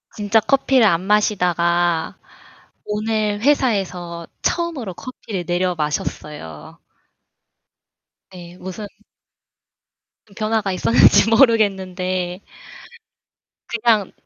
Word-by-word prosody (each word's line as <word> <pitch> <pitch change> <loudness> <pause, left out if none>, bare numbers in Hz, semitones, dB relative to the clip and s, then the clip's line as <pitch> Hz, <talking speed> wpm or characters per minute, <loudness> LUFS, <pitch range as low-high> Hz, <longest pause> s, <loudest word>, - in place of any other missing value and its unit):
진짜 210 +1 +2
커피를 260 +1 +3
안 170 -3 +2
마시다가 175 -4 +1 0.7
오늘 210 0 -1
회사에서 190 - 0 0.2
처음으로 315 - -2
커피를 215 -5 -7
내려 180 +1 0
마셨어요. 150 - -5 1.5
네 175 -1 -12
무슨 190 +3 -7 1.5
변화가 215 -2 0
있었는지 225 +3 +4
모르겠는데 190 -6 +1 1.3
그냥 225 -4 +1
195 Hz, 195 characters per minute, -20 LUFS, 175-220 Hz, 1.5 s, 있었는지